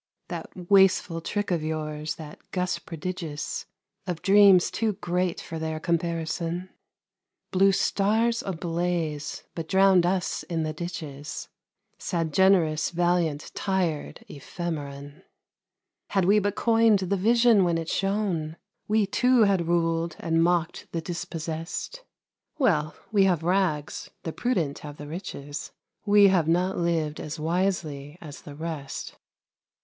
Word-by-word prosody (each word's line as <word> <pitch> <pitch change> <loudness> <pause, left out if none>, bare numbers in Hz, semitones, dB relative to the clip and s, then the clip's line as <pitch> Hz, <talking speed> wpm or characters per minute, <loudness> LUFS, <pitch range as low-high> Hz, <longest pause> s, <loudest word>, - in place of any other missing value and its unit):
That - - -5 0.2
wasteful 190 -3 +4
trick 205 +3 -2
of 170 -3 +1
yours, 155 -1 -3
that 155 -2 -10
gust 180 -1 -2
prodigious 165 -2 -5 0.4
Of 175 -3 -4
dreams 195 -2 +6
too 225 -2 0
great 180 -1 -1
for 165 - -6
their 160 0 -3
comparison, 170 +1 -2 0.8
Blew 195 +1 +5
stars 220 +4 +1
ablaze, 170 -4 -2
but 165 -2 -5
drowned 190 -1 +5
us 185 0 -1
in 165 -2 -2
the 155 0 -2
ditches. 155 -3 -6 0.5
Sad, 165 -4 -2
generous, 170 -5 +4
valiant, 175 -3 0
tired 180 -6 -2
ephemeron! 145 -1 -6 0.9
Had 195 -3 +1
we 205 +3 +5
but 205 0 -1
coined 225 -2 +4
the 190 +1 -1
vision 230 +1 +4
when 170 -2 +2
it 165 -1 -4
shone 190 -6 -1 0.3
We, 215 0 +3
too, 250 +4 +3
had 195 -5 +2
ruled, 165 0 +1
and 165 0 +2
mocked 170 -1 0
the 165 - -1
dispossessed. 165 - -5 0.5
Well! 155 - +2 0.2
we 200 -3 +4
have 175 -4 +2
rags, 175 -5 0
the 165 - -4
prudent 175 - -1
have 145 -1 -9
the 145 - -8
riches 145 -3 -6 0.4
We 205 -1 +7
have 175 -5 +2
not 180 +3 +2
lived 165 -3 0
as 155 +1 -6
wisely 160 -3 -1
as 150 -4 -10
the 145 - -10
rest. 155 -3 -6
170 Hz, 130 wpm, -26 LUFS, 155-195 Hz, 0.9 s, We